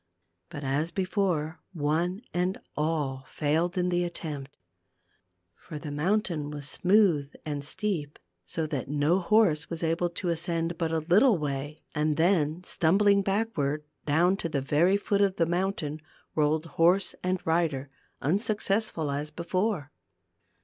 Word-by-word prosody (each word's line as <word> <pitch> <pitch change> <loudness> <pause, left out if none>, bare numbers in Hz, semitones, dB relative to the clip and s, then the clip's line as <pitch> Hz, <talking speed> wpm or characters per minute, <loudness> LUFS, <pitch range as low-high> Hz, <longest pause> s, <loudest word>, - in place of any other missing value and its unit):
But 145 - -7
as 140 +4 0
before 180 -4 -1
one 170 - 0
and 180 +2 0 0.2
all 150 -4 -1
failed 165 +4 0
in 180 0 +1
the 175 0 +1
attempt. 150 -5 -5 1.0
For 155 - -9
the 150 -1 -6
mountain 165 -1 0
was 145 -1 -5
smooth 180 -6 +3
and 145 -2 -3
steep, 155 -2 -2 0.3
so 160 - -3
that 145 -4 -3
no 150 +5 +2
horse 175 -5 +3
was 165 0 -4
able 165 +2 +1
to 175 +1 -4
ascend 170 0 -1
but 165 -2 0
a 160 -1 0
little 210 +5 +5
way 145 0 -4
and 150 0 0
then, 165 -1 +2
stumbling 200 +4 +3
backward, 195 -8 -1 0.2
down 175 +6 +3
to 165 - -3
the 145 - 0
very 155 +8 +3
foot 200 0 0
of 195 -2 +3
the 170 - +2
mountain 170 -3 -2 0.3
rolled 155 +1 +1 0.2
horse 185 +3 +4
and 185 0 0
rider, 155 -5 0 0.3
unsuccessful 195 - 0
as 145 +2 -2
before. 175 -1 -2
165 Hz, 140 wpm, -28 LUFS, 150-185 Hz, 1.0 s, little